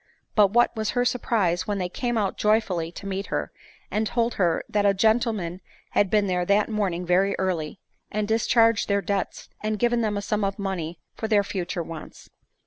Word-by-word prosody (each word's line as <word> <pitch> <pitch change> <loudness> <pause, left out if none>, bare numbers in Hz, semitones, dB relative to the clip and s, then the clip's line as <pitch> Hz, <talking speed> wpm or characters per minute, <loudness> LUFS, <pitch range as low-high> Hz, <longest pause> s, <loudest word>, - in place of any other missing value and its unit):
But 210 -2 +6
what 240 +4 +3
was 215 -1 -1
her 245 - +3
surprise 195 -8 +1
when 205 -1 -1
they 180 -2 -1
came 240 +6 -2
out 200 -3 0
joyfully 200 -6 +1
to 185 - -10
meet 195 0 -3
her, - - -2 0.4
and 215 +1 0
told 235 +2 0
her 175 -4 +1
that 205 -1 +1
a 200 -1 +4
gentleman 215 -4 +1 0.3
had 205 - +2
been 210 0 +3
there 180 -2 0
that 200 +4 +2
morning 190 -5 -1
very 185 +3 +2
early, 180 -3 -2 0.3
had 210 0 -1
discharged 225 0 +3
their 200 -1 +1
debts, 195 +1 -2
and 215 0 -1
given 240 +1 +2
them 210 -2 0
a 200 - -3
sum 210 +1 -1
of 195 0 -1
money 185 -5 -3 0.2
for 220 - -2
their 210 -2 +3
future 180 -2 -3
wants 160 -1 -10
200 Hz, 195 wpm, -25 LUFS, 185-220 Hz, 0.4 s, But